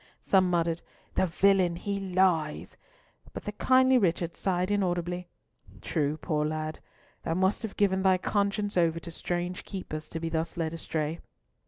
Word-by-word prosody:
Some 185 -2 +3
muttered, 170 -1 +1 0.3
"The 190 - +2
villain! 185 0 +3
he 200 +3 -3
lies," 180 -5 +1 0.6
but - - -6
the 210 - -3
kindly 260 +4 +4
Richard 170 -3 0
sighed 185 0 0
inaudibly, 175 -3 -1 0.5
"True, 150 -2 -1
poor 150 -1 -1
lad! 155 0 -3 0.4
Thou 165 - -2
must 190 +2 +2
have 220 -3 -6
given 190 -2 +2
thy 190 -1 +4
conscience 205 +2 0
over 165 -1 +3
to 170 0 -9
strange 175 +2 -3
keepers 155 -6 -6
to 165 - -4
be 165 0 -3
thus 165 +1 -2
led 160 -1 -1
astray." 160 -1 -3
175 Hz, 155 wpm, -29 LUFS, 165-195 Hz, 0.6 s, kindly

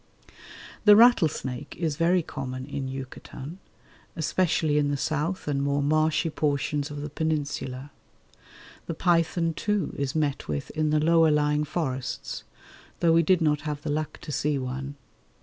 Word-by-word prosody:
The 210 -1 +8
rattlesnake 160 - +3
is 160 -4 -1
very 170 +3 +2
common 130 -3 -5
in 135 -1 -4
Yucatan, 135 +4 -8 0.6
especially 160 -2 +1
in 145 -1 +1
the 145 - 0
south 155 +5 -2
and 140 -2 0
more 140 0 +1
marshy 155 +2 +2
portions 145 0 -1
of 145 -1 -6
the 150 - -5
Peninsula. 145 -3 -3 1.0
The 165 - -3
python, 165 -1 +2
too, 205 0 -1
is 140 0 -2
met 150 -3 -1
with 75 -2 -3
in 155 -1 0
the 155 0 +3
lower 165 +1 +4
lying 150 0 +2
forests, 135 -5 -3 0.6
though 165 -1 +4
we 165 - +6
did 180 +1 +3
not 150 -2 +2
have 150 -1 -4
the 150 - -2
luck 155 0 -2
to 150 - -6
see 145 +2 0
one. 135 +2 -4
150 Hz, 150 wpm, -26 LUFS, 140-165 Hz, 1.0 s, The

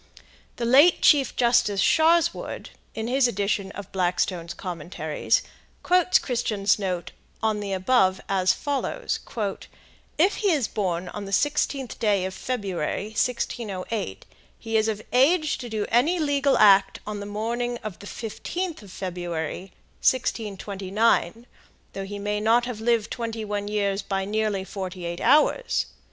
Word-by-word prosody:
The 235 - -3
late 280 +9 +6
Chief 280 -4 +5
Justice 235 -4 +3
Sharswood, 330 - +2 0.2
in 220 - -3
his 260 +1 +3
edition 200 -2 -1
of 200 -2 -9
Blackstone's 175 -2 -1
Commentaries, 170 - -2 0.4
quotes 365 0 +4
Christian's 215 -5 0
note 180 -4 -3 0.3
on 215 -1 +1
the 205 -1 -4
above 190 -1 +2
as 185 -1 +2
follows: 285 - -2 1.0
"If 370 +7 +3
he 410 - +1
is 275 -8 +1
born 180 -3 -2
on 205 +1 -6
the 195 - -8
16th 280 0 0
day 205 -5 +2
of 190 - -4
February, 195 -3 -3
1608, 220 - -3 0.3
he 225 -1 -5
is 220 0 +3
of 215 -1 -2
age 310 +5 +3
to 245 -2 -6
do 215 -2 -2
any 275 +10 +3
legal 285 -3 +2
act 195 -2 +5
on 210 -1 -5
the 200 - -6
morning 235 +4 -2
of 215 -5 -6
the 205 - -10
15th 330 - -5
of 200 -3 -13
February, 175 -1 -4 0.3
1629, 215 -1 0 0.5
though 195 0 -5
he 205 +1 -6
may 205 +1 -2
not 230 +3 +3
have 240 -3 -5
lived 230 -2 +1
twenty 230 -2 -4
one 205 0 -3
years 200 -1 0
by 195 -1 -2
nearly 210 -1 -1
forty 185 -2 -6
eight 170 0 -4
hours. 470 +11 +3
210 Hz, 140 wpm, -25 LUFS, 195-245 Hz, 1.0 s, late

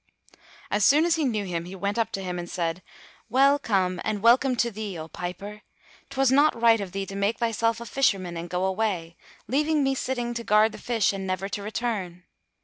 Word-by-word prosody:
As 205 0 +1
soon 300 +8 +5
as 345 - +3
he 315 -3 0
knew 215 -5 -1
him, 170 -2 -3
he 185 +2 -8
went 200 +3 -2
up 230 - 0
to 195 - -3
him 180 -1 -4
and 175 0 -6
said, 170 0 -2 0.5
"Well 275 +4 +4
come, 185 -7 0
and 210 -2 -2
welcome 250 +2 +5
to 235 0 0
thee, 205 -3 -5
O 160 0 -7
piper! 185 +6 -7 0.5
'Twas 270 -1 +2
not 285 -2 +4
right 230 -2 +5
of 190 -2 -6
thee 195 +1 -3
to 195 - -8
make 200 +3 0
thyself 230 0 0
a 235 - -7
Fisherman 195 -9 0
and 170 +1 -6
go 180 +1 -1
away, 190 -4 -2 0.3
leaving 300 +5 +1
me 270 0 +2
sitting 245 -2 -2
to 235 0 -4
guard 215 +1 +4
the - - -10
fish, 225 -5 +1
and 195 -1 -5
never 185 +1 -2
to 205 - -4
return! 205 -5 -4
210 Hz, 215 wpm, -26 LUFS, 185-240 Hz, 0.5 s, soon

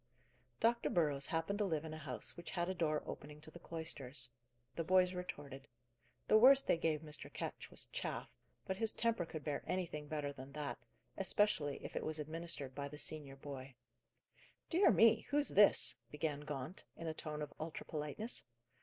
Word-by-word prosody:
Dr. 235 +1 +3
Burrows 145 -5 +3
happened 165 +6 -1
to 210 - +3
live 160 -4 -1
in 155 - -5
a - - -5
house 140 -5 +1
which 170 - -7
had 175 0 -1
a 185 - 0
door 155 -4 0
opening 150 +1 -7
to 155 - -9
the 170 - -11
cloisters. 140 -7 -4 0.5
The 165 - -1
boys 185 +2 +4
retorted. 145 -6 -6 0.6
The 215 - +7
worst 270 +3 +8
they - - +4
gave 160 -2 0
Mr. 150 -2 -4
Ketch - - -5
was - - -4
"chaff;" - - -4 0.3
but 190 - -2
his 225 +1 0
temper 230 -7 0
could 155 -3 -6
bear 150 -2 -2
anything 160 -5 -2
better 145 -2 -2
than 135 0 -10
that, 150 -1 -4 0.4
especially 190 -7 +3
if - - -7
it - - -1
was 155 0 0
administered 155 -3 -3
by 140 +1 -4
the 150 +1 -9
senior 145 -3 -2
boy. 135 -2 -8 1.0
"Dear 360 +4 +6
me, 225 -1 +5
who's 290 0 +3
this?" 205 0 +5
began 150 -1 -2
Gaunt, 145 +2 -5
in 165 - -6
a 160 - -1
tone 150 -1 -4
of 145 - -7
ultra 160 0 -5
politeness. 155 +10 -2
155 Hz, 180 wpm, -38 LUFS, 145-180 Hz, 1.0 s, worst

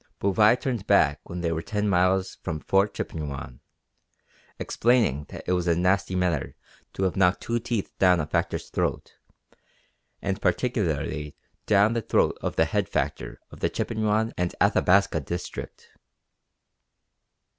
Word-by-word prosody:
Bouvais 105 +5 +4
turned 120 -6 -3
back 75 -7 +4
when 90 0 -5
they 85 -1 0
were 80 0 -2
ten 105 +3 -2
miles 95 0 +1
from 80 -4 -4
Fort 100 +5 +1
Chippewyan, 70 -5 -5 1.0
explaining 110 - +1
that - - -8
it 90 - 0
was 90 -1 0
a 85 - +3
nasty 95 +2 +1
matter 90 -5 -1 0.4
to 95 - -3
have 95 - 0
knocked 95 0 +3
two 120 0 -1
teeth 115 -3 -3
down 90 -2 +5
a 75 - -1
factor's - - -2
throat, - - -2 1.1
and 95 +1 -3
particularly 80 - -1 0.3
down 105 +1 +4
the 115 - -1
throat - - +2
of - - -3
the - - +3
head - - -1
factor - - -3
of - - -12
the - - +1
Chippewyan 110 0 -1
and 90 0 -1
Athabasca 95 -3 +3
district. 85 +5 -7
95 Hz, 145 wpm, -26 LUFS, 85-105 Hz, 1.1 s, down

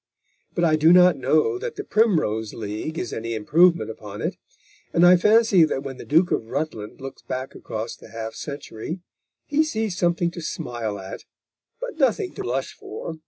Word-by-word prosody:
But 175 - +1
I 155 -2 +4
do 160 +2 +5
not 180 0 +7
know 120 -7 +2
that - - -5
the - - -5
Primrose 155 - +1
League 110 +9 -5
is - - -3
any 115 0 -3
improvement 165 +7 +3
upon 105 -2 -9
it, - - -1 0.6
and 170 - +5
I 180 +1 +8
fancy 210 -1 +5
that 135 -3 -2
when 135 -1 -6
the - - -9
Duke 165 +5 +3
of 110 - 0
Rutland 115 -6 -4
looks 135 0 -8
back 130 +1 -5
across 110 +1 -5
the - - -15
half 110 0 -6
century 145 +4 -6 0.4
he 300 +1 +2
sees 220 - -2
something 175 -1 +1
to 170 - -7
smile 120 -8 -4
at, 95 -1 -8 0.5
but - - -6
nothing 280 - +1
to - - -6
blush 130 +2 -2
for. 160 +8 -8
155 Hz, 180 wpm, -24 LUFS, 115-180 Hz, 0.6 s, I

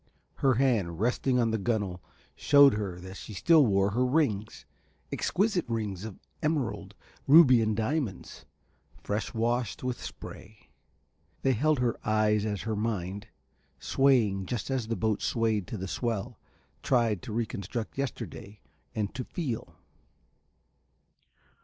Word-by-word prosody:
Her 135 -2 +3
hand 110 -10 +1
resting 125 +3 +1
on 115 -2 +2
the 110 - 0
gunnel 100 -4 -1 0.3
shewed 140 -2 +6
her 100 -4 -3
that 95 +2 -9
she 105 - -9
still 155 - +5
wore 100 0 +2
her 120 +5 +1
rings, 125 -7 0 0.5
exquisite 195 -3 0
rings 105 -4 -3
of 110 -4 -8 0.2
emerald, 150 -7 -2 0.3
ruby 135 -5 +8
and 110 -1 0
diamonds, 115 - -3 0.6
fresh 105 +2 -2
washed 120 +2 -1
with 125 -1 -3
spray. 110 -1 -10 0.7
They 135 - +3
held 150 +6 +2
her 125 -2 0
eyes 110 -1 +2
as 105 -2 -3
her 110 -1 -2
mind, 100 -2 -3 0.5
swaying 115 -9 +2
just 120 +2 -3
as 130 -4 -1
the 115 - -1
boat 110 -2 0
swayed 110 -5 0
to 110 - -5
the 95 0 -5
swell, 115 0 -3 0.4
tried 115 -6 +1
to 120 - -8
re 115 +2 0
construct 110 +3 -5
yesterday 120 -6 -5 0.4
and 105 -2 -2
to 125 - -4
feel. 130 -5 -5
115 Hz, 135 wpm, -29 LUFS, 105-130 Hz, 0.7 s, ruby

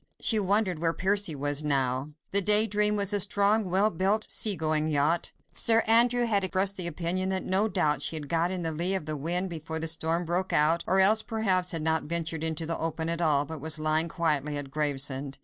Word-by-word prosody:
She 220 - +3
wondered 200 -3 0
where 165 0 -1
Percy 195 -3 0
was 145 +1 0
now. 135 -1 -1 0.2
The 200 - +5
Day 210 +2 +6
Dream 210 0 +1
was 200 0 +2
a 205 - +1
strong, 205 +1 +1
well 195 +4 +1
built, 195 +6 0
sea 210 -3 +1
going 155 -2 -1
yacht. 155 +3 0 0.2
Sir 225 0 +3
Andrew 240 +2 +3
had 205 -4 0
expressed 190 +1 -1
the 180 -3 -1
opinion 175 +3 -2
that 190 -1 -2
no 195 +3 0
doubt 150 -8 -1
she 150 - 0
had 150 -2 -6
got 165 +3 0
in 185 -1 -4
the 165 - -1
lee 175 +5 0
of 185 - -4
the 155 0 -3
wind 175 +5 -2
before 160 -1 -6
the 160 0 -2
storm 165 +2 0
broke 180 +3 -2
out, 160 +3 +2
or 190 +1 +2
else 210 +3 +5
perhaps 200 -6 -1
had 165 -3 -1
not 160 0 0
ventured 165 0 -2
into 160 0 -1
the 165 +1 -3
open 160 0 -3
at 170 +1 -3
all, 145 -3 +1
but 160 -1 -8
was 160 +1 0
lying 155 +1 +1
quietly 150 -4 -1
at 140 -2 -6
Gravesend. 140 -2 -1
170 Hz, 220 wpm, -27 LUFS, 155-195 Hz, 0.2 s, Day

